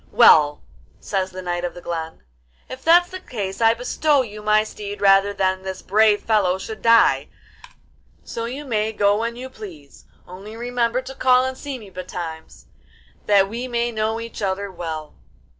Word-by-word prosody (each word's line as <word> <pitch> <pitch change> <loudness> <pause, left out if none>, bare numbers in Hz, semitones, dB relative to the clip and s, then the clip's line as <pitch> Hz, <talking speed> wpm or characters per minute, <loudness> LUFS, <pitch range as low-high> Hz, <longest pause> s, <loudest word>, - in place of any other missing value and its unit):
'Well,' 145 -1 +6 0.4
says 190 -2 -2
the 185 0 -8
Knight 175 0 -2
of 175 - -4
the - - -8
Glen, 160 - -5 0.4
'if 260 +1 -9
that's 350 +2 +5
the 370 - -6
case 205 - -5
I 225 0 +5
bestow 285 +3 +1
you 210 -2 -9
my 215 0 +3
steed 205 -1 -7
rather 195 0 +5
than 190 -1 0
this 190 0 -6
brave 210 +1 +3
fellow 200 -5 +2
should 215 +3 -8
die; 230 0 +4 1.0
so 230 - -5
you 270 +5 -6
may 220 -3 -1
go 205 0 +2
when 235 +1 -2
you 255 +2 -7
please, 180 - -12 0.2
only 195 +5 -10
remember 240 +1 -1
to 265 +1 -8
call 255 -1 +3
and 260 0 -3
see 280 0 -6
me 210 -5 -13
betimes, 175 -3 -8 0.6
that 200 -2 +5
we 235 +5 -5
may 240 -1 -1
know 220 0 -1
each 230 -1 -8
other 195 0 -2
well. 160 -4 -6
210 Hz, 175 wpm, -22 LUFS, 190-235 Hz, 1.0 s, Well